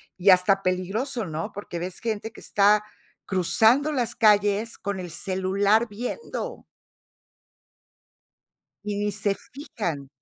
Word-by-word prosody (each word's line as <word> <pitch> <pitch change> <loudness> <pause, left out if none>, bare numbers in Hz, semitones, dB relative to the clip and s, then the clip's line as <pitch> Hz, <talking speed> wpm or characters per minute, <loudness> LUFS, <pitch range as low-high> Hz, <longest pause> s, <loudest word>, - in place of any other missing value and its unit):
Y 190 +2 +2
hasta 190 +1 +5
peligroso, 195 +7 -1
¿no?, 165 +5 -4
porque 200 -4 -7
ves 180 +1 -5
gente 220 -1 -3
que - - -14
está 210 +1 +3 0.4
cruzando 220 - +3
las 245 -5 -1
calles 210 0 +3
con 200 -2 -4
el 180 -1 -6
celular 195 +6 +1
viendo. 250 - -5 2.2
Y 210 -1 -3
ni 205 0 -1
se 200 0 0 0.2
fijan. 175 - -5
205 Hz, 115 wpm, -25 LUFS, 185-225 Hz, 2.2 s, hasta